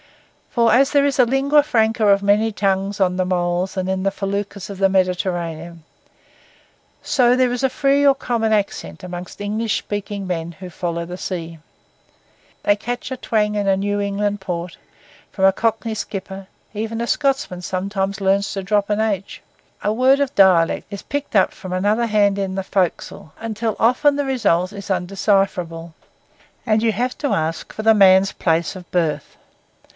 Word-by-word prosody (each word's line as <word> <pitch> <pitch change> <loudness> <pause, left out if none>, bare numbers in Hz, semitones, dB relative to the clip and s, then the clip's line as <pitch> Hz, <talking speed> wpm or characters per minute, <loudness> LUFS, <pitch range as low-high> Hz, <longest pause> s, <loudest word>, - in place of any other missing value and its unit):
For 235 -2 +3
as 270 +3 +4
there 285 -1 +3
is 280 -1 0
a 250 - +7
lingua 275 +4 +3
franca 225 -6 +1
of 200 0 +4
many 210 +2 +3
tongues 195 -1 -1
on 180 -2 +2
the 185 - +1
moles 180 +1 -1
and 185 0 -1
in 190 0 -1
the 195 - +1
feluccas 200 0 -4
of 195 -1 -8
the 195 -1 +4
Mediterranean, 175 -3 -2 1.2
so 250 -2 +3
there 255 -1 +3
is 245 - -3
a 265 - +3
free 275 +2 +2
or 275 -1 +6
common 230 -4 -1
accent 205 -2 -2
among 180 0 -6
English 215 +2 -1
speaking 205 -1 -5
men 170 -1 -3
who 185 +2 -10
follow 170 0 -3
the 180 +1 -7
sea. 170 -3 -5 1.0
They 205 - +3
catch 240 +5 -5
a - - -2
twang 210 -3 0
in 205 -1 -1
a 195 -1 +3
New 205 +1 -1
England 205 0 -1
Port; 175 -2 -5 0.6
from 190 - +1
a 195 - +5
cockney 225 +1 -1
skipper, 195 -2 -6 0.3
even 220 +2 -4
a 235 - -2
Scotsman 270 -12 0
sometimes 195 +2 -2
learns 195 +1 +1
to 195 -2 -4
drop 205 +1 0
an 210 0 0
h; 205 -3 -2 0.4
a 210 - +1
word 260 +4 +4
of 280 -2 0
a - - -36
dialect 185 -4 +4
is 200 -1 -7
picked 285 -4 -4
up 190 - +3
from 185 - -9
another 205 +6 +1
band 205 -2 +2
in 190 -1 -2
the 195 - -2
forecastle; 185 -4 -2
until 225 0 -3
often 255 +5 +3
the 285 - 0
result 205 -8 +1
is 200 -1 -9
undecipherable, 180 -3 -1 0.7
and 220 -1 +2
you 230 - +3
have 245 +4 -2
to 285 - -1
ask 160 -3 -2
for 215 - -6
the 220 0 +6
man's 195 -1 +5
place 165 +2 0
of 180 -2 -11
birth. 155 -5 -1
200 Hz, 180 wpm, -20 LUFS, 185-225 Hz, 1.2 s, a